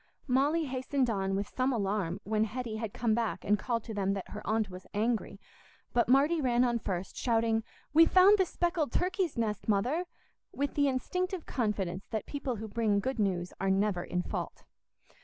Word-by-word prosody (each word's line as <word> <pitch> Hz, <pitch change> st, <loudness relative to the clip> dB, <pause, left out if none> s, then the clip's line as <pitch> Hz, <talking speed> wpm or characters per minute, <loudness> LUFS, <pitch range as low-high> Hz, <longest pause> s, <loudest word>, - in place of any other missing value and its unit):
Molly 290 Hz, +5 st, +2 dB
hastened 260 Hz, -1 st, 0 dB
on 195 Hz, -2 st, -1 dB
with 200 Hz, +1 st, -1 dB
some 260 Hz, +1 st, +2 dB
alarm 200 Hz, -5 st, -1 dB
when 215 Hz, +1 st, +1 dB
Hetty 225 Hz, 0 st, -4 dB
had 220 Hz, -2 st, -4 dB
come 225 Hz, 0 st, 0 dB
back 225 Hz, -4 st, -1 dB
and 210 Hz, +1 st, +3 dB
called 235 Hz, -3 st, -1 dB
to 225 Hz, -, -7 dB
them 195 Hz, -1 st, 0 dB
that 195 Hz, -2 st, -5 dB
her 210 Hz, -, -7 dB
aunt 220 Hz, 0 st, +1 dB
was 185 Hz, -1 st, -10 dB
angry; 225 Hz, +2 st, -1 dB, 0.5 s
but 240 Hz, -1 st, +2 dB
Marty 290 Hz, +5 st, +4 dB
ran 245 Hz, -2 st, +3 dB
on 240 Hz, -1 st, +1 dB
first, 185 Hz, -3 st, -4 dB
shouting, 225 Hz, -2 st, +1 dB, 0.3 s
"We've 325 Hz, +2 st, +7 dB
found 390 Hz, +3 st, +7 dB
the 380 Hz, -, +4 dB
speckled 340 Hz, -7 st, 0 dB
turkey's 365 Hz, -, 0 dB
nest, 220 Hz, -2 st, -2 dB
Mother!" 250 Hz, -, +1 dB, 0.5 s
with 285 Hz, +1 st, -2 dB
the 285 Hz, -1 st, +3 dB
instinctive 360 Hz, -, -2 dB
confidence 195 Hz, -6 st, -2 dB
that 220 Hz, -2 st, -3 dB
people 280 Hz, -4 st, -3 dB
who 220 Hz, +1 st, -6 dB
bring 215 Hz, -1 st, +1 dB
good 260 Hz, +4 st, -2 dB
news 180 Hz, -4 st, 0 dB
are 195 Hz, -, +1 dB
never 195 Hz, -2 st, +1 dB
in 180 Hz, 0 st, -2 dB
fault. -, -, -5 dB
230 Hz, 185 wpm, -31 LUFS, 205-270 Hz, 0.5 s, We've